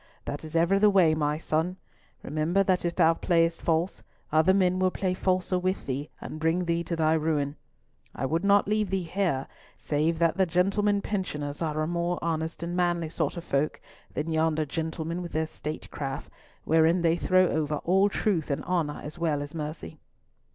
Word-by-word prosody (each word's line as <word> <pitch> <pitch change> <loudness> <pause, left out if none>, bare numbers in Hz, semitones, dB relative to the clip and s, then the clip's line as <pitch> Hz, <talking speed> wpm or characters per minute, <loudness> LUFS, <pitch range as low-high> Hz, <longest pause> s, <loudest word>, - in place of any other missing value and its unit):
"That 145 - -5
is 155 +1 -6
ever 170 +4 +3
the 210 +1 +6
way, 185 -6 +5
my 150 -1 0
son! 165 +3 -1 0.5
Remember 155 +6 +1
that 185 -2 +1
if 170 - -1
thou 165 -2 +5
playest 165 -1 +1
false, 165 +3 0 0.3
other 160 +4 +4
men 185 -1 +2
will 185 0 +3
play 185 0 -1
falser 185 0 0
with 185 +1 -1
thee 140 +3 -3
and 155 - -7
bring 165 +3 +1
thee 170 0 0
to 170 - -2
thy 160 -1 +2
ruin. 150 -3 0 0.6
I - - -2
would 165 +6 0
not 200 0 +4
leave 210 -1 +1
thee 190 -1 -1
here 170 -6 -1 0.3
save 155 +3 0
that 165 +1 +2
the 190 -1 +3
gentlemen 200 +4 +2
pensioners 150 -8 -3
are 155 -2 -1
a - - 0
more 175 +1 -1
honest 160 0 -2
and 170 +1 -3
manly 175 -2 +1
sort 160 +1 -2
of 170 - -5
folk 140 -1 -1 0.3
than 155 +2 -3
yonder 160 -1 +1
gentlemen 160 +2 -3
with 175 - -7
their 160 +1 +1
state 155 0 -7
craft, 135 -2 -5 0.3
wherein 165 +2 +3
they 165 0 +4
throw 185 +1 +3
over 150 -1 0
all 190 +3 +3
truth 185 -6 0
and 140 - -1
honour 170 -5 -1
as 150 +4 -8
well 160 -4 +1
as 145 +2 -9
mercy." 155 0 -6
165 Hz, 190 wpm, -27 LUFS, 155-180 Hz, 0.6 s, the